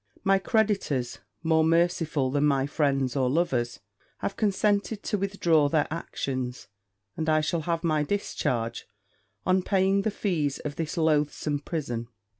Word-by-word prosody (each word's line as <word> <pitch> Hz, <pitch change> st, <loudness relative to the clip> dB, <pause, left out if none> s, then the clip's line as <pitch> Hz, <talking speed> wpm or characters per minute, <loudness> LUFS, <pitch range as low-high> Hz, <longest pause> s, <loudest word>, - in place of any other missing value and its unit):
My 195 Hz, 0 st, +4 dB
creditors, 195 Hz, -, 0 dB, 0.2 s
more 160 Hz, -1 st, +3 dB
merciful 165 Hz, -4 st, +2 dB
than 145 Hz, +1 st, +1 dB
my 140 Hz, -2 st, +3 dB
friends 135 Hz, -3 st, 0 dB
or 130 Hz, -2 st, +2 dB
lovers, 125 Hz, -6 st, 0 dB, 0.4 s
have 195 Hz, -, -3 dB
consented 205 Hz, 0 st, +1 dB
to 210 Hz, -, -1 dB
withdraw 170 Hz, -7 st, +2 dB
their 150 Hz, -1 st, +2 dB
actions; 130 Hz, -6 st, -4 dB, 0.5 s
and 160 Hz, 0 st, -2 dB
I 155 Hz, 0 st, +4 dB
shall 160 Hz, +2 st, -1 dB
have 165 Hz, +1 st, -2 dB
my 155 Hz, -3 st, +2 dB
discharge 120 Hz, -, -2 dB, 0.6 s
on 185 Hz, 0 st, +3 dB
paying 195 Hz, +1 st, +2 dB
the 220 Hz, -, 0 dB
fees 165 Hz, -9 st, -1 dB
of 150 Hz, -1 st, -5 dB
this 160 Hz, +1 st, -4 dB
loathsome 150 Hz, -2 st, +1 dB
prison. 135 Hz, -7 st, -4 dB
155 Hz, 140 wpm, -27 LUFS, 140-185 Hz, 0.6 s, My